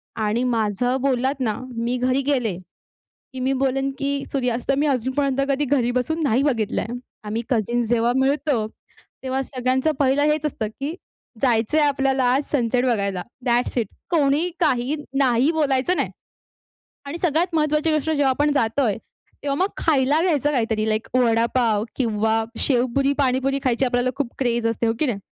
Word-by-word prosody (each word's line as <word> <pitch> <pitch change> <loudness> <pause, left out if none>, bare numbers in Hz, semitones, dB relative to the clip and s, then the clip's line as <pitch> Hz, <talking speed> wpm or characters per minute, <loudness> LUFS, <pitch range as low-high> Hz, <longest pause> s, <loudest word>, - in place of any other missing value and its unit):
आणि 220 +3 0
माझं 240 +1 0
बोललात 265 +1 0
ना, 225 -5 0 0.2
मी 235 +2 -1
घरी 255 +2 +1
गेले, 250 -9 0 0.8
की 260 - -6
मी 260 +1 +1
बोलेन, 270 +1 0
की 280 0 -1
सूर्यास्त 250 -1 -1
मी 290 - +2
अजूनपर्यंत 270 +1 0
कधी 280 +2 +1
घरी 250 -3 +1
बसून 315 +7 -1
नाही 265 0 +2
बघितलाय. 225 -6 0 0.4
आम्ही 215 +2 -3
कझन्स 240 0 0
जेव्हा 235 0 +2
मिळतो, 270 -3 +1 0.6
तेव्हा 265 0 -1
सगळ्यांचं 260 +3 0
पहिलं 275 +1 +3
हेच 305 0 -1
असतं, 245 -7 -2
की 290 +4 -3 0.5
जायचंय 245 +4 +2
आपल्याला 270 -2 +2
आज 275 +3 +1
सनसेट 250 -2 +1
बघायला, 200 -7 0 0.2
दॅट्स 245 +1 +1
इट! 225 -5 +1 0.2
कोणी 310 +1 +2
काही 270 -3 +1 0.2
नाही 260 +2 +3
बोलायचं 295 +1 +1
नाही. - - 0 1.0
आणि 320 +5 -5
सगळ्यात 335 +1 +1
महत्त्वाची 305 0 +1
गोष्ट, 310 +1 0
जेव्हा 285 -3 +2
आपण 290 +3 +1
जातोय, 230 -4 +1 0.5
तेव्हा 280 -1 -1
मग 390 - +2
खायला 290 -1 +2
घ्यायचं 295 -5 +2
काहीतरी, 225 -5 0
लाइक 215 0 -1
वडापाव 230 -2 +2
किंवा 220 -2 +1
शेवपुरी, 270 +1 +1
पाणीपुरी 270 0 +1
खायची 255 0 +2
आपल्याला 245 0 +1
खूप 280 -3 -1
क्रेझ 240 -3 0
असते, 230 0 0
हो 225 - +2
की 310 - +3
नाही? 230 -6 -1
260 Hz, 155 wpm, -22 LUFS, 235-280 Hz, 1.0 s, पहिलं